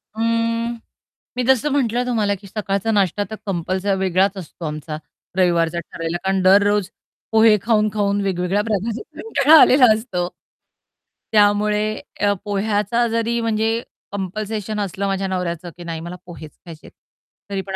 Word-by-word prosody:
अं, 230 +1 0 0.6
मी 250 - +1
जसं 265 +2 +3
म्हटलं 250 -3 +1
तुम्हाला, 215 -5 0
की 200 +1 -14
सकाळचा 200 +1 -2
नाष्टा 200 -1 +1
तर - - -3
कंपल्सरी 190 +1 -1
वेगळाच 190 +1 +1
असतो 170 -1 -8
आमचा 150 0 -5 0.4
रविवारचा 170 -2 +2
ठरलेला 165 +1 -4
कारण 190 0 +1
दररोज 200 +1 +4 0.4
पोहे 220 -1 +6
खाऊन-खाऊन 210 -2 +1
वेगवेगळ्या 190 +1 0
प्रकारचे 215 +1 -2
कंटाळा 315 -7 +5
आलेला 260 0 +7
असतो. 190 -6 -3 1.0
त्यामुळे 210 0 +3 0.4
अ, 205 0 +3
पोह्याचा 210 +3 0
जरी 230 +1 0
म्हणजे 225 0 0 0.3
कंपल्शन 210 +2 -4
असलं 200 0 -2
माझ्या 195 0 -1
नवऱ्याचं, 175 -2 -3
की 175 - -9
नाही 165 -1 -5
मला 170 +2 -7
पोहेच 160 -3 -10
खायचेत, 165 -2 -12 0.6
तरी 195 -1 -2
पण 190 0 -6
205 Hz, 135 wpm, -20 LUFS, 185-220 Hz, 1.0 s, आलेला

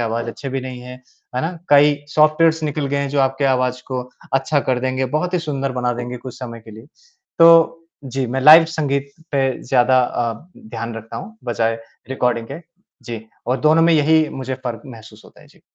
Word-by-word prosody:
आवाज़ 115 0 -2
अच्छी 135 +4 -6
भी 135 0 -3
नहीं 125 -1 -7
है, 125 +1 -9 0.4
है - - +1
ना? 160 - -1 0.2
कई 145 +1 +6
सॉफ्टवेयर्स 155 +2 +3
निकल 150 -1 -2
गए 140 - -2
हैं 140 0 -1
जो 140 0 0
आपके 135 +1 0
आवाज़ 125 -1 0
को 130 -1 -3 0.3
अच्छा 135 +2 +1
कर 130 -1 +2
देंगे, 130 +1 -1
बहुत 155 +8 -2
ही - - +2
सुंदर 140 -5 -3
बना 125 -1 -1
देंगे 120 +1 -5
कुछ 125 0 -10
समय 115 -3 -8
के 110 - -14
लिए। 110 +3 -13 0.5
तो 165 0 +6 0.2
जी, 135 -1 -3
मैं 130 +3 -2
लाइव 155 +5 +9
संगीत 140 -2 -1 0.2
पे 135 -2 0
ज़्यादा 130 0 +3
अ, 120 -1 -1 0.2
ध्यान 170 - -7
रखता 115 0 -8
हूँ 220 +4 -9
बजाए 115 -1 -1 0.3
रिकॉर्डिंग 125 -3 -1
के। 170 - -7 0.4
जी 115 -2 -7 0.2
और 125 +1 -1
दोनों 155 +3 +4
में 165 +1 +4
यही 155 +1 +3
मुझे 130 -1 -5
फ़र्क 120 -2 -4
महसूस 110 -4 -13
होता - - -18
है। - - -19
जी। - - -24
130 Hz, 200 wpm, -19 LUFS, 125-150 Hz, 0.5 s, लाइव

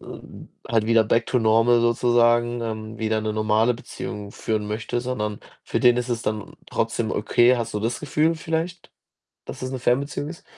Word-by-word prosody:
äh, - - -15 0.6
halt 115 -2 +1
wieder 115 -1 +4
back 115 +2 +1
to 125 - +1
normal 115 +1 +4
sozusagen, 120 0 +3
ähm, 110 -1 -5
wieder 110 -1 0
'ne 110 0 -2
normale 110 +2 +2
Beziehung 105 -3 -7
führen 110 -2 -2
möchte, 110 +3 -3
sondern 105 -4 -3 0.2
für - - -2
den 120 -1 +5
ist 125 0 -2
es 115 -2 -2
dann 105 -1 -4 0.2
trotzdem - - -1
okay. 120 +1 +3
Hast 115 -2 -4
du 105 - -1
das 115 +3 -2
Gefühl 155 +2 +1
vielleicht, 165 +2 -4 0.6
dass - - -8
es 130 - -3
'ne 130 - -3
Fernbeziehung 140 +4 0
ist? 170 - -10
115 Hz, 180 wpm, -23 LUFS, 110-125 Hz, 0.6 s, den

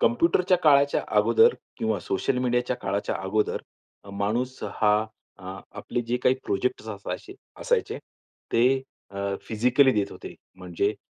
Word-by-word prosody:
कॉम्प्युटरच्या 230 - +3
काळाच्या 140 -2 +4 0.2
अगोदर 460 +1 +5 0.2
किंवा - - 0
सोशल 380 - -1
मीडियाच्या 125 0 0
काळाच्या 100 -3 -2
अगोदर 105 +3 0 0.5
माणूस 115 +6 -2
हा 105 -1 +2 0.4
अ, 95 0 -8 0.2
आपले 120 - -3
जे 120 +1 -1
काही 125 - +4
प्रोजेक्ट 125 +4 -1
असायचे 100 -2 -6 0.3
असायचे - - 0 0.5
ते 130 +3 +3 0.3
अ, 100 0 -3
फिजिकली 125 +5 +3
देत 105 -3 0
होते. - - -9 0.2
म्हणजे 95 +3 -1
120 Hz, 125 wpm, -26 LUFS, 100-130 Hz, 0.5 s, अगोदर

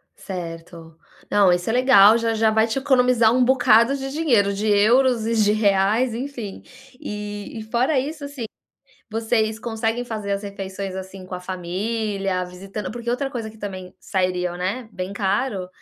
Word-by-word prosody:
Certo, 165 -2 -8 0.3
não, 200 -3 +4
isso 175 +3 0
é - - +1
legal, 230 -4 +6
já 230 -1 0
já 220 0 +3
vai 220 +1 +3
te 225 - -2
economizar 250 -4 +3
um 255 0 +3
bocado 245 -1 +4
de 270 0 -5
dinheiro, 245 -10 +2
de 205 +2 -2
euros 230 +3 +4
e 230 - 0
de 210 -2 +3
reais, 210 +3 +2
enfim. 240 -4 -6 0.4
E 210 +1 -6
e - - -6
fora 250 +6 +1
isso, 295 +3 -5
assim, 280 -4 -6 0.6
vocês 220 0 0
conseguem 225 +1 -2
fazer 215 -4 -4
as 200 +1 -2
refeições, 195 -1 -6
assim, 190 0 -8
com 185 - -10
a - - -6
família, 195 +1 -2
visitando 190 +2 -7
porque 235 +1 -5
outra 270 +3 -1
coisa 230 -3 -4
que 220 - -15
também 185 -3 -7
sairia, 180 -2 -1
né, 195 +7 -3
bem 185 +1 -5
caro, 200 0 -1
215 Hz, 165 wpm, -22 LUFS, 195-240 Hz, 0.6 s, legal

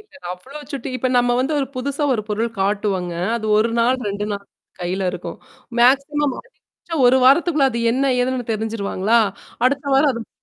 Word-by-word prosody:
இல்லங்க, 290 - -14
அவ்ளோ 260 +11 -10
சுட்டி 270 -2 -4
இப்ப 255 +1 -1
நம்ம 245 0 +2
வந்து 270 +4 -1
ஒரு 270 - -1
புதுசா 280 +3 -3
ஒரு 215 - -2
பொருள் 225 +3 -1
காட்டுவாங்க. 195 -3 -1 0.2
அது 220 -2 -4
ஒரு 225 +2 +2
நாள், 245 +3 +3
2 205 +1 -3
நாள் 200 0 -5 0.4
கையில 185 +2 -2
இருக்கும் 180 +3 -7 0.4
மேக்ஸிமம் 275 +2 +3
அதிகபட்சம் 335 - -7
ஒரு 250 - +5
வாரத்துக்குள்ள 295 +1 +4
அது 235 - -3
என்ன 265 +3 +1 0.2
ஏதுன்னு 250 -1 -1
தெரிஞ்சுருவாங்களா? 220 0 0 0.5
அடுத்த 280 +2 +1
வாரம் 280 +2 +4
அதும், 230 -2 -7
245 Hz, 165 wpm, -20 LUFS, 210-275 Hz, 0.5 s, ஒரு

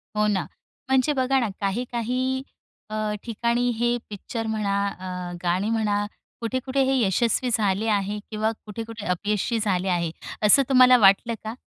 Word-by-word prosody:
हो 210 0 +2
ना. 200 -2 0 0.4
म्हणजे 265 +3 +3
बघा 265 0 +2
ना 230 -4 0
काही-काही 245 +5 -1 0.5
अ, 215 - -5 0.3
ठिकाणी 235 +1 0
हे 240 +1 +1
पिक्चर 225 +3 -5
म्हणा, 210 -2 -1
अ, 180 -1 -6
गाणी 180 +4 0
म्हणा, 210 -2 +1 0.4
कुठे-कुठे 260 +3 -1
हे - - +2
यशस्वी 235 +5 +1
झाले 210 +1 +1
आहे 200 +1 -2
किंवा 215 +1 0
कुठे-कुठे 225 0 -7
अपयशी 210 +5 -1
झाले 190 -3 0
आहे. 170 -2 0 0.3
असं 275 +7 +7
तुम्हाला 255 -1 +7
वाटलं 205 +2 +4
का? 220 +1 -4
220 Hz, 145 wpm, -24 LUFS, 200-245 Hz, 0.5 s, असं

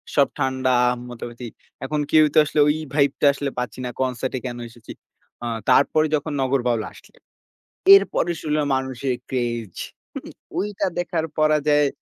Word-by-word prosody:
সব 140 -2 +5
ঠান্ডা 130 -1 +1 0.4
মোটামুটি 120 0 -8 0.4
এখন 150 +2 -1
কেউ 155 -1 +6
তো - - 0
আসলে 150 - -1
ওই 150 - +3 0.2
ভাইব 140 -2 +3
টা - - +4
আসলে 140 0 -3
পাচ্ছি 125 -1 -5
না - - -3
কনসার্ট 130 0 -2
এ - - -3
কেন 120 -1 -4
এসেছি। 115 -1 -13 0.5
আ - - -3 0.2
তারপরে 140 +4 +4
যখন 150 +1 -3
নগর 135 0 +1
বাউল 120 -2 +1
আসছে। - - -18 0.8
এরপরে 395 - +2
শুনলাম 150 -1 0
মানুষের 130 0 -2
craze 120 -6 -3 0.8
ওইটা 205 0 -1
দেখার 170 -2 -1
পরাজয় 150 -1 +3
135 Hz, 150 wpm, -22 LUFS, 125-150 Hz, 0.8 s, কেউ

